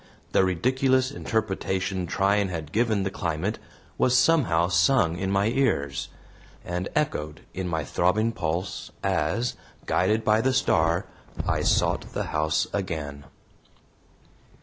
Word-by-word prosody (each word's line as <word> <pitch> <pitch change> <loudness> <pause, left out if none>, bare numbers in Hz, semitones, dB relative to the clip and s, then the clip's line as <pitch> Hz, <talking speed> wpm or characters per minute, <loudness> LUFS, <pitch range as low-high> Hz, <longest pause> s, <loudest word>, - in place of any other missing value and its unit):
The - - +4
ridiculous 130 +8 +2
interpretation 95 -6 -2
Tryan 100 +3 +2
had 80 -4 -5
given 110 -2 +1
the 95 - -2
climate 85 +4 -2 0.4
was 125 0 +4
somehow 105 - +3
sung 95 -4 +3
in 95 +1 -2
my 100 +2 +2
ears, 70 - 0 0.6
and 90 +1 -3
echoed 75 - -1
in 95 -1 -3
my 80 -3 -1
throbbing 100 - +1
pulse 85 -1 -3
as, 100 +11 0 0.3
guided 105 +5 +1
by 110 +1 +4
the 130 +2 +1
star, 85 -6 +2 0.4
I - - +1
sought - - +1
the - - -1
house 75 0 +1
again. 75 -8 -4
95 Hz, 125 wpm, -26 LUFS, 80-110 Hz, 0.6 s, The